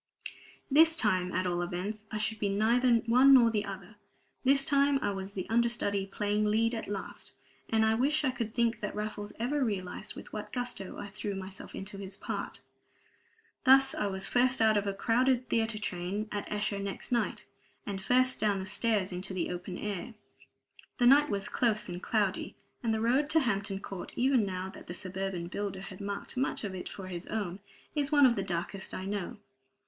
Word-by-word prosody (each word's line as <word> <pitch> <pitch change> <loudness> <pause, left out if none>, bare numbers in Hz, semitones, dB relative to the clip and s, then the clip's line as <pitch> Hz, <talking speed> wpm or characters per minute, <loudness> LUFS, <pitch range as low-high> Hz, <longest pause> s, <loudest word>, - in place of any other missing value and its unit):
This 320 +3 +6
time, 185 - +1
at 185 0 0
all 175 -1 0
events, 195 +5 -4
I 215 - -3
should 215 +1 -2
be 205 - 0
neither 230 +5 +3
one 255 +4 +7
nor 235 -3 +6
the 210 -2 0
other; 195 +1 -8 0.5
this 275 +1 +4
time 280 -1 +3
I - - +1
was 195 0 -5
the 185 -3 -4
understudy 225 -4 +1
playing 205 +1 0
lead 225 +2 +2
at 225 - -4
last; 200 -1 -6 0.4
and 220 -1 +3
I 220 - +3
wish 285 +7 +2
I 260 - +2
could 230 -3 -4
think 235 -1 +1
that 210 - -4
Raffles 210 0 -4
ever 270 +5 0
realized 195 -6 -3
with - - -11
what - - -5
gusto 245 -6 -4
I 200 - -6
threw 205 0 -4
myself 190 0 -8
into 195 +1 -6
his 195 0 -6
part. - - -5 1.0
Thus 270 +1 +6
I 210 - -1
was 190 -1 -1
first 255 +1 +3
out 220 -1 +5
of 205 0 +1
a 200 - 0
crowded 250 +4 +2
theatre 225 -1 +1
train 200 +1 -3
at 205 -1 -4
Esher 205 -1 -1
next 200 +4 -4
night, 240 -1 0 0.4
and 195 -2 -4
first 255 +5 +3
down 210 -2 +2
the 190 - -4
stairs 205 -1 +1
into 185 +1 -4
the 175 -1 -1
open 180 +1 -5
air. 210 +2 -4 0.8
The 245 - +3
night 290 +4 +6
was 200 -2 -1
close 225 -3 +1
and 175 0 -5
cloudy; 205 -4 0 0.3
and 230 - 0
the 220 0 0
road 260 +6 +2
to 320 - +4
Hampton 200 -5 -1
Court, 195 -2 -7
even 250 -4 +3
now 185 0 -3
that - - -12
the 175 - -5
suburban 190 -1 -3
builder 195 +1 -4
has 190 -1 -9
marked 200 +3 -5
much 260 -2 -1
of 200 -3 -3
it 185 - -6
for 195 - -8
his 180 -1 -6
own, 200 -4 -3 0.3
is 290 -1 -1
one 290 -2 +6
of 240 -2 +5
the 195 - -1
darkest 185 +2 -3
I 185 - -5
know. 200 -2 -3
210 Hz, 195 wpm, -30 LUFS, 195-240 Hz, 1.0 s, one